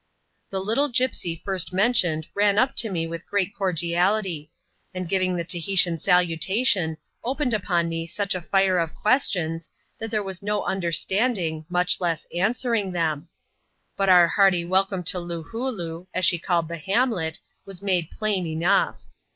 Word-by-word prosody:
The 190 - -2
little 230 +10 +1
gipsy 235 -10 -1
first 190 -3 0
mentioned 185 -7 +2
ran 205 0 +2
up 255 +4 +2
to 225 - +2
me 170 -4 -2
with 165 +1 -7
great 200 -1 0
cordiality; 175 -2 0 0.5
and 185 -1 -4
giving 185 0 +1
the 170 - -2
Tahitian 175 0 +1
salutation, 180 +1 +2 0.3
opened 260 0 -1
upon 175 -5 0
me 165 0 -3
such 200 +3 -1
a 185 - -4
flre 185 0 +2
of 160 - -9
questions, 175 - 0 0.3
that 225 - -4
there 215 -1 -1
was 190 -2 -6
no 210 0 -1
understanding, 175 -2 0
much 180 +1 +1
less 170 -3 -1
answering, 220 +2 0
them. 160 -2 -1 0.7
But 195 -1 +1
our 175 -2 +7
hearty 180 -1 +3
welcome 190 +1 +1
to 180 +2 0
Loohooloo, 175 0 -5
as 185 0 +2
she 175 -1 +4
called 170 -1 0
the 170 +1 -5
hamlet, 190 - +1 0.3
was 195 -1 -6
made 180 -5 0
plain 205 -5 -2
enough. 160 +2 +1
185 Hz, 150 wpm, -24 LUFS, 170-205 Hz, 0.7 s, our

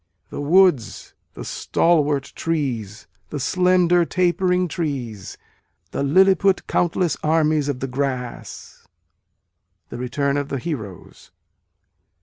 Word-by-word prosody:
The - - -5
woods, 160 - +2 0.2
the - - -8
stalwart 150 -5 0
trees, 125 -10 -3 0.2
the 150 - -5
slender, 180 +2 +3
tapering 180 +1 +1
trees, 130 - -5 0.5
The - - -3
lilliput 190 +6 +3
countless 175 0 0
armies 155 -2 +1
of 130 -3 -3
the 135 - -2
grass. 130 -2 -5 1.0
(The 120 - -7
Return 140 +3 -1
of 145 0 -3
the 140 - -2
Heroes.) 115 - -7
150 Hz, 105 wpm, -21 LUFS, 130-175 Hz, 1.0 s, slender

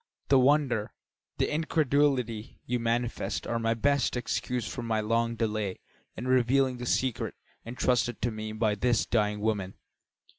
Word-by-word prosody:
The 135 - +6
wonder, 130 -5 +2 0.4
the - - 0
incredulity 140 -7 +1
you 125 0 -1
manifest 120 +1 -1
are 115 - -1
my 115 0 +1
best 140 +1 +1
excuse 120 -1 -2
for 100 - -5
my 115 -2 0
long 115 +2 0
delay 110 -4 -1 0.4
in 125 - -4
revealing 130 +1 +3
the 120 0 -5
secret 130 -1 0 0.3
entrusted 120 -1 0
to 120 - +1
me 110 0 -5
by 110 -1 +1
this 120 +3 +1
dying 105 -2 0
woman." 105 -3 -1
120 Hz, 145 wpm, -29 LUFS, 110-130 Hz, 0.4 s, The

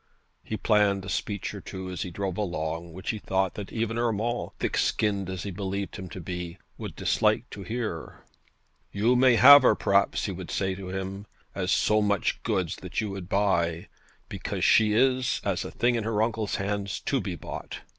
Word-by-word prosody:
He 110 - -4
planned 100 -3 +2
a - - -6
speech 100 +2 -3
or - - -7
two 95 -1 -7
as 90 - -5
he 90 - -3
drove 95 +1 -3
along 85 -4 -3
which 95 +3 -4
he 110 - -5
thought 95 -1 0
that 100 -2 -7
even 115 0 -1
Urmand, 120 +1 -1
thick - - -1
skinned 100 -3 +1
as 95 -2 -4
he 100 - -4
believed 100 +1 -4
him 95 -3 -7
to 95 - -8
be, 90 +1 -5 0.2
would - - -7
dislike - - +1
to 100 - -8
hear. 110 -5 -5 0.7
'You 110 +5 +2
may 125 -1 +5
have 140 +4 +10
her, 130 - +5
perhaps,' 100 0 +2
he 100 - -2
would 90 -1 -7
say 95 -1 -1
to 95 0 -7
him, 95 +2 -5 0.3
'as 95 -1 -1
so 105 0 +3
much 100 -1 0
goods 95 -7 -1
that 90 -1 -4
you 110 -2 -2
would 95 -2 -7
buy, 85 -4 +1 0.4
because - - -3
she 110 -1 +5
is, 130 +2 +2
as - - -1
a - - -6
thing 120 +1 +1
in 115 -2 -1
her 110 -1 +1
uncle's 110 -2 -1
hands, 100 0 -2
to - - 0
be - - -4
bought. - - -7
100 Hz, 195 wpm, -27 LUFS, 95-110 Hz, 0.7 s, have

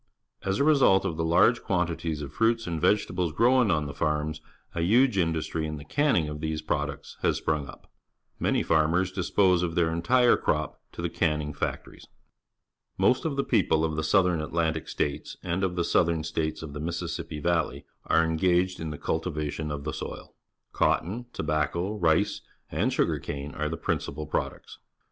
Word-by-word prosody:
As 95 0 -1
a - - +2
result 135 -11 +5
of 85 -4 -1
the 80 - -2
large 85 +9 +4
quantities 85 -5 -1
of 70 0 -8
fruits 115 +4 +2
and 85 -3 -3
vegetables 90 -2 +1
grown 120 +5 +4
on 80 -4 +1
the 70 - -6
farms, 75 0 -1 0.3
a 85 - -2
huge 120 +7 +4
industry 80 -2 0
in 75 0 -5
the 70 - -10
canning 135 - +2
of 75 0 -5
these 80 -1 -3
products 75 -1 -3
has - - +2
sprung 75 -3 -1
up. - - -12 0.5
Many - - +1
farmers 85 +4 +2
dispose 95 -1 +2
of 85 -2 -2
their 85 -2 +2
entire 120 +9 +4
crop - - -1
to - - -6
the - - 0
canning 75 -1 0
factories. 70 - -5 0.9
Most 130 - +3
of 155 -3 -1
the 140 - +1
people 85 -10 +2
of 80 -1 -2
the 80 - -1
South 95 +4 +4
Atlantic 80 -2 -1
States 70 -1 -3
and 90 +3 -1
of 90 -2 0
the 85 - +1
Southern 85 -2 +2
States 80 0 -2
of 75 -3 -7
the 75 - -6
Mis 85 +2 -3
sissippi 85 -2 -5
Valley 85 +2 0 0.2
are 80 +1 +4
engaged 90 +3 +1
in 80 - -4
the 75 - -5
cultivation 75 -2 -3
of 75 -1 -4
the 75 -1 -3
soU. - - -7 0.4
Cotton, 115 +8 0
tobacco, 80 +4 -1
rice, 100 +1 +1 0.3
and - - +1
sugar - - +1
cane_are 75 +2 -4
the 80 - -4
principal 75 +2 -3
products. - - -4
80 Hz, 175 wpm, -27 LUFS, 75-95 Hz, 0.9 s, result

